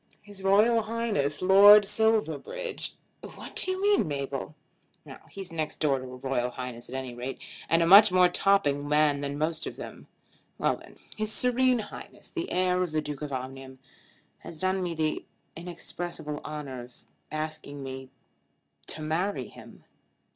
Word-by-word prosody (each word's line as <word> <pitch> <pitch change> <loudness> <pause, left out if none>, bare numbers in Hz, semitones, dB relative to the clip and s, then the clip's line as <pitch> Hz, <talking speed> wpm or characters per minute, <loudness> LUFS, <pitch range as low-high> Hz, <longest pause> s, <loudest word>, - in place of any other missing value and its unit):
His 205 -2 -14
Royal 210 +4 +4
Highness 215 -10 -1
Lord 200 +2 +8
Silverbridge 220 - 0
" - - -43
"What - - -10
do - - +3
you 370 0 -1
mean, 405 - +3
Mabel?" 140 0 -4 0.7
"He's 195 -3 -8
next 160 -2 -3
door 140 -4 +2
to - - -8
a 125 0 -9
Royal 125 -1 -1
Highness 125 -1 -7
at 130 - -7
any 130 -2 -4
rate, 125 +2 -6 0.3
and 165 +1 +4
a - - +2
much 195 +3 +9
more 180 0 +6
topping 160 -7 +1
man 150 -1 +3
than 140 0 -3
most 155 +1 -2
of - - -6
them. - - -10 0.5
Well - - +1
then; - - -16 0.2
His 215 0 0
Serene 250 +2 +3
Highness 215 -2 -9
the 345 -1 -5
heir 180 0 +1
of 175 -4 -2
the 155 - +1
Duke 150 -1 -6
of 150 -1 -5
Omnium 130 0 -6 0.6
has 160 - -10
done 185 +1 0
me 175 -2 -3
the 155 -1 -1 0.3
inexpressible 170 -2 -6
honour 145 -4 -6
of 120 +1 -13 0.4
asking 155 -2 -5
me 130 0 -7 0.8
to 155 - -2
marry 160 - -2
him." - - -14
160 Hz, 160 wpm, -28 LUFS, 140-200 Hz, 0.8 s, much